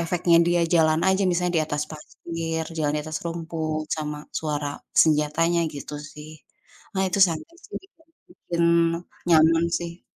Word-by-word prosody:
efeknya 170 0 +2
dia 175 0 +2
jalan 160 -1 +4
aja 190 +1 +2
misalnya 180 0 0
di 155 - +2
atas 150 0 -2
pasir, 165 +1 -5
jalan 150 -2 0
di - - -1
atas 155 0 -4
rumput, 160 -2 -3
sama 150 -1 -4 0.2
suara 150 -2 -2 0.3
senjatanya 160 +2 +2
gitu, 145 +1 -7 0.2
sih. 150 +1 -10 0.6
Nah 190 - +1
itu 185 - -1
sama, 160 -1 -3 0.2
sih, 415 - -8
juga 340 -4 -25 0.2
bikin 170 -1 -4 0.7
nyaman, 165 +1 +5 0.2
sih. 170 0 -7
165 Hz, 150 wpm, -24 LUFS, 155-170 Hz, 0.7 s, nyaman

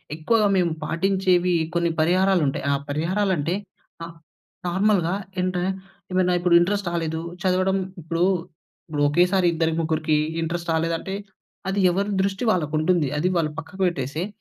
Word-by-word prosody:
ఎక్కువగా 210 +7 +2
మేము 175 -2 +2
పాటించేవీ 180 0 +1 0.2
కొన్ని 170 -1 +2
పరిహారాలుంటాయి. 175 -5 +2
ఆ - - +2
పరిహారాలంటే, 170 +1 0 0.5
ఆహ్, 165 0 -11 0.5
నార్మల్‌గా 190 -1 +2 0.3
ఇంట్ర 185 -1 -1 0.5
ఏమైనా 185 -1 +2
ఇప్పుడు 175 -1 +4
ఇంట్రస్ట్ 200 +1 0
రాలేదు, 160 -1 -2 0.2
చదవడం 185 +1 +2 0.2
ఇప్పుడూ, 165 +2 0 0.6
ఇప్పుడు 145 -2 0
ఒకేసారి 180 +4 +3
ఇద్దరి 165 0 +1
ముగ్గురికి 155 -1 +1 0.3
ఇంట్రస్ట్ 170 +1 -3
రాలేదంటే, 165 +4 -1 0.5
అది 195 +1 -1
ఎవరి 195 +3 0
దృష్టి 195 +3 -1
వాళ్ళకుంటుంది. 155 -1 +1
అది 170 +5 +1
వాళ్ళు 155 -2 0
పక్కకు 165 +4 -7
పెట్టేసెయి. 155 +2 -3
175 Hz, 125 wpm, -23 LUFS, 160-190 Hz, 0.6 s, ఇప్పుడు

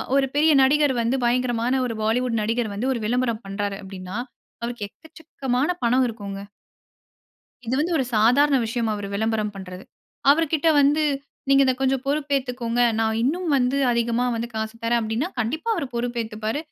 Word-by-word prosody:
ஒரு 275 -1 +4
பெரிய 310 +2 +4
நடிகர் 290 +1 +3
வந்து, 235 +3 +1
பயங்கரமான 245 +1 +1
ஒரு 230 - -4
பாலிவுட் 230 +1 +1
நடிகர் 225 0 -1
வந்து, 240 +6 -1
ஒரு 235 - -4
விளம்பரம் 235 0 0
பண்றாரு 200 0 -3
அப்படினா, 190 +1 -7 0.5
அவருக்கு 235 -3 -4
எக்கச்சக்கமான 280 - -4 0.2
பணம் 255 +2 +3
இருக்குங்க. 200 -3 -7 1.2
இது 240 +3 -1
வந்து 340 +4 0
ஒரு 270 - +1
சாதாரண 260 +7 +4
விஷயமா. 230 -1 -1
அவரு 205 -1 -5
விளம்பரம் 215 0 -1
பண்றது. 185 -1 -8 0.5
அவருக்கிட்ட 320 +1 +1
வந்து 295 +2 +3 0.5
நீங்க 275 0 +6
இத 260 - +3
கொஞ்சம் 265 -1 +1
பொறுப்பு 285 0 0
ஏத்துக்கோங்க. 245 -2 -2 0.2
நான் 220 0 +1
இன்னும் 335 +5 0
வந்து 255 +1 +1
அதிகமா 235 +1 +1
வந்து 230 +1 -3
காசு 220 +1 -3
தரேன் 235 +1 +2
அப்பிடின்னா, 225 +9 -2
கண்டிப்பா 265 - -2
அவரு 305 -8 -3
பொறுப்பு 240 0 -2
ஏத்துப்பாரு. 220 +5 -4
240 Hz, 160 wpm, -23 LUFS, 220-270 Hz, 1.2 s, நீங்க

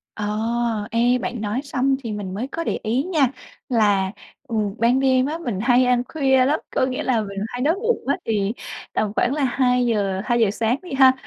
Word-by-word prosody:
Ờ, 210 0 -2 0.5
ê 240 +2 +3
bạn 235 +1 -4
nói 215 +4 -2
xong 275 -1 +1
thì 230 - -4
mình 205 -3 -5
mới 225 +7 -3
có 330 +4 -4
để - - -2
ý 235 +5 0
nha, 315 -6 +2 0.4
là, 205 -5 +2 0.4
ừ, 230 - -4 0.2
ban 235 +3 +3
đêm 260 -1 +3
á 310 +4 -2
mình 240 - -4
hay 245 +2 +4
ăn 245 -1 +2
khuya 265 -4 +3
lắm. 295 +4 +1 0.2
Có - - +3
nghĩa 255 0 -3
là 240 -4 +1
mình 200 -1 -7
hay 245 +2 -5
đói 310 +6 +2
bụng 460 +4 -1
á, 280 - +2
thì 210 -2 0 0.4
tầm 215 -2 0
khoảng 245 - +2
là 295 -1 -1
hai 250 -1 +2
giờ 200 -5 0
hai 240 -1 +1
giờ 220 -4 +3
sáng 225 +4 0
đi 360 -5 -9
ha, 265 -1 +7
245 Hz, 220 wpm, -22 LUFS, 215-270 Hz, 0.5 s, ha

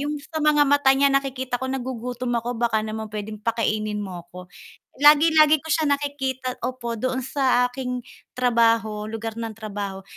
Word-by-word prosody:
'Yong 295 +1 -2
sa 315 0 -5
mga 300 -1 +4
mata 285 -1 +4
niya 280 0 +3
nakikita 260 -2 -1
ko, 260 - -3
"Nagugutom 250 -1 -4
ako 240 +1 -4
baka 230 -2 +1
naman 215 0 -5
puwedeng 215 0 -5
pakainin 215 -2 -1
mo 185 -4 -7
ako." 180 +1 -12 0.5
Lagi-lagi 305 +1 +6
ko 320 - -10
siya 310 0 +2
nakikita 270 -3 -2
opo, 250 -2 -4
doon 255 +3 -1
sa 260 -1 +2
aking 250 -1 -4 0.3
trabaho, 230 -3 +2
lugar 225 +1 -5
ng 225 -1 -5
trabaho. 200 -3 -6
250 Hz, 160 wpm, -23 LUFS, 220-275 Hz, 0.5 s, Lagi-lagi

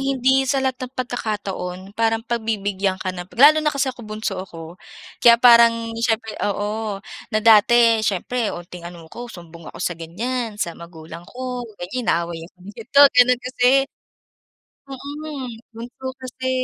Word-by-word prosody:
hindi 265 0 +2
sa 275 -1 +2
lahat 260 -1 +1
ng 260 - -39
pagkakataon 205 -7 -4 0.2
parang 225 0 0
pagbibigyan 205 -4 -1
ka 185 - -3
na 180 - -5
lalo 295 +5 +6
na 300 - +2
kasi 280 -1 -1
ako 250 - -14
bunso 215 -3 -4
ako. 165 -2 -10 0.5
Kaya 235 -1 +8
parang 235 -1 +5
siyempre 225 -2 -1
oo, 205 0 -2 0.3
na 215 - +1
dati 230 +1 +6
siyempre 215 +3 -1
unting 175 0 -9
ano 170 -2 -12
ko 240 0 -8
sumbong 170 -2 -12
ako - - -12
sa 175 -1 -2
ganyan 220 +7 -4
sa 170 - -2
magulang 165 0 -11
ko 250 -1 -5 0.2
ganyan 190 +9 -4
inaaway 170 0 0
ako 185 - -34 0.2
dito 235 +5 -2
gano'n 250 0 +5
kasi. 255 +2 +3 1.0
Mm, 280 +1 -7 0.3
bunso 240 +3 -9
kasi, 260 0 -5
225 Hz, 150 wpm, -21 LUFS, 190-250 Hz, 1.0 s, Kaya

